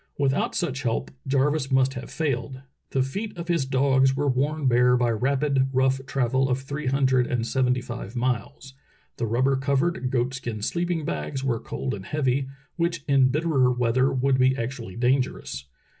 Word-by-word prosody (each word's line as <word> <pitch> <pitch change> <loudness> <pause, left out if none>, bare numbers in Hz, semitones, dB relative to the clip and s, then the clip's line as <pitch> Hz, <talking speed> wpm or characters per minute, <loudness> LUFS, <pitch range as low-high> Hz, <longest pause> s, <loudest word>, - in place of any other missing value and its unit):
Without 140 -1 0
such 135 -1 -1
help 115 -3 -2 0.2
Jarvis 140 +1 +1
must 130 0 +3
have 125 - -7
failed. 135 -3 -2 0.3
The 130 - +1
feet 200 +9 -5
of 170 0 -6
his 170 -6 +1
dogs 135 0 +3
were 145 +1 0
worn 140 +3 0
bare 125 0 +4
by 120 -1 +2
rapid, 135 +3 +1
rough 130 0 +1
travel 130 0 +1
of 125 0 +1
three 140 +2 -5
hundred 130 -2 +2
and 120 -2 -1
sevent3^ 125 0 +1
five 120 -2 -7
miles, 130 +3 -3 0.4
the 115 - -1
rubber 130 +5 +2
covered, 140 +1 0
goat 125 0 0
skin 120 -5 -5
sleep 175 +8 -1
ing 165 -4 -1
bags 80 - -3
were 120 -4 0
cold 130 - -4
and 95 -2 -7
heavy, 135 -2 0 0.3
which 170 -2 -1
in 135 -2 +4
bitterer 140 -3 +2
weather 125 +2 +2
would 130 0 +1
be 130 +1 +3
actually 115 -5 -5
dangerous. 125 - -1
130 Hz, 175 wpm, -25 LUFS, 125-140 Hz, 0.4 s, bare